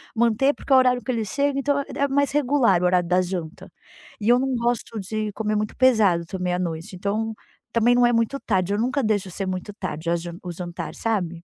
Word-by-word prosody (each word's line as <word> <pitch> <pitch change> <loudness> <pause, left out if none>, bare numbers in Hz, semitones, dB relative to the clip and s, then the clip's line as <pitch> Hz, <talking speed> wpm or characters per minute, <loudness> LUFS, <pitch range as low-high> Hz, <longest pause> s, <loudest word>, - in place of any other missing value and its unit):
manter 235 +4 +3
porque - - -10
é - - +8
o - - +8
horário 250 -1 +2
que 255 - -2
ele 230 -3 -1
chega, 280 +7 0
então, 285 +1 +1
ah 280 - 0
é 280 - +1
mais 280 +1 +1
regular 270 -9 +3
o - - +1
horário 180 -1 +2
da 180 +1 +3
janta. 175 -3 -5 0.5
E 215 +1 -1
eu 245 +1 +6
não 265 0 0
gosto 235 -2 -1
de 215 +2 -3
comer 215 0 -1
muito 210 0 -2
pesado 215 -10 +3
também 180 +1 -3
à 180 - -1
noite, 170 0 -4
então 210 +4 -2 0.4
também 235 +1 +3
não 245 0 +5
é 240 - +3
muito 230 +4 0
tarde. 190 -4 0
Eu 205 - 0
nunca 260 +4 0
deixo 205 -4 0
ser 195 +3 -4
muito 185 +2 -4
tarde 170 -5 -5
a 170 - +2
jan 170 0 -6
o 180 - -5
jantar, 175 0 -6
sabe? 180 -7 -2
215 Hz, 235 wpm, -23 LUFS, 180-245 Hz, 0.5 s, é